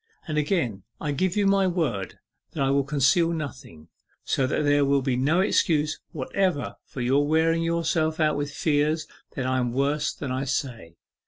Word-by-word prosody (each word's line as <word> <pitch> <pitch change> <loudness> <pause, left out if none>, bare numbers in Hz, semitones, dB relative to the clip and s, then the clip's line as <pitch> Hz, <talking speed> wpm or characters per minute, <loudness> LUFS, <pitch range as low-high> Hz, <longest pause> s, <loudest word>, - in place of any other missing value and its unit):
And 155 - -3
again 145 - -1 0.2
I 150 - -2
give 185 +7 0
you 205 - +2
my 195 -1 +3
word 135 - -2 0.4
that 140 - -1
I 135 - +2
will 140 0 +2
conceal 145 +4 +2
nothing 120 - -7 0.3
so 130 - 0
that 150 - 0
there 145 0 +3
will 140 -1 +2
be 130 -2 0
no 150 +8 +2
excuse 155 -6 +1
whatever 155 0 -1
for 130 - -6
your 135 +4 +2
wearing 165 +2 +2
yourself 165 -1 0
out 155 -1 +2
with 145 0 -2
fears 155 +1 0 0.3
that 130 - -2
I 130 0 +1
am 120 -1 -1
worse 140 +2 0
than 135 - -6
I 130 +2 -2
say. 125 - -4
145 Hz, 180 wpm, -25 LUFS, 130-160 Hz, 0.4 s, my